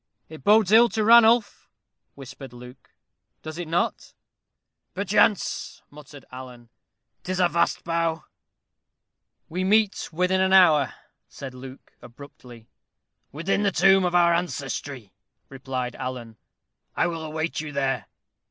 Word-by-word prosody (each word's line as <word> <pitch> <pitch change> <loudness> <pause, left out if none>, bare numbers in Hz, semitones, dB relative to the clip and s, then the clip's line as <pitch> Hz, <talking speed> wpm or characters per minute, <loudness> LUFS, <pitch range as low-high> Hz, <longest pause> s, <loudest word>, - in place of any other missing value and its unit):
"It 155 0 -12
bodes 210 -1 +4
ill 235 +2 +6
to 220 - -2
Ranulph," 230 0 +4 0.5
whispered 135 -1 -11
Luke, 125 +1 -14 0.5
"does 155 +2 -8
it 175 - -5
not?" 170 +2 -2 0.8
"Perchance," 205 +1 0
muttered 145 -1 -14
Alan. 125 -2 -11 0.5
"'Tis 185 0 -4
a 180 - +4
vast 170 0 -1
bough!" 165 -1 -2 1.2
"We 180 +3 -4
meet 210 +1 +1
within 180 +3 0
an 190 0 +1
hour," 160 -7 +5 0.4
said 135 -2 -9
Luke, 130 +1 -12
abruptly. 120 -3 -14 0.6
"Within 165 +7 -1
the 200 -1 +1
tomb 190 +2 +4
of 180 -1 -1
our 170 -1 +4
ancestry," 140 - -4 0.4
replied 130 -2 -5
Alan; 120 -3 -7 0.6
"I - - +1
will 165 -2 -4
await 155 +1 -4
you 155 -1 -7
there." 135 -2 -2
160 Hz, 125 wpm, -24 LUFS, 135-190 Hz, 1.2 s, ill